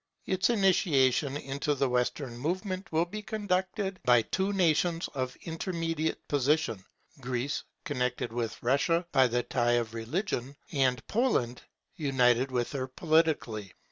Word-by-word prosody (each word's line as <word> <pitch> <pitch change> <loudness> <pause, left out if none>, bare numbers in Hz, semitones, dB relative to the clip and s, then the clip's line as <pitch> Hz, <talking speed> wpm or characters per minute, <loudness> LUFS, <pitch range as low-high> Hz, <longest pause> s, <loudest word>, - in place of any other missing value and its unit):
Its 190 +2 +1
initiation 150 - +3
into 140 +1 -2
the 135 0 +1
Western 125 +1 -1
movement 185 - -3
will 165 +1 +2
be 210 +5 -6
conducted 195 -2 -2
by 120 -2 +5
two 190 - -1
nations 170 -2 +2
of 130 -2 -3
intermediate 165 -1 -2
position; 145 -7 +1 0.4
Greece, 125 +2 -2 0.2
connected 125 -4 -2
with 115 -2 -2
Russia 155 +7 +2
by 130 -1 +5
the 120 0 0
tie 120 -1 +1
of 115 -2 0
religion; 130 - -3 0.2
and 130 -6 +1
Poland, 205 - +1 0.4
united 130 -3 +3
with 125 -2 -1
her 130 -2 -3
politically. 130 - +1
140 Hz, 130 wpm, -29 LUFS, 125-175 Hz, 0.4 s, by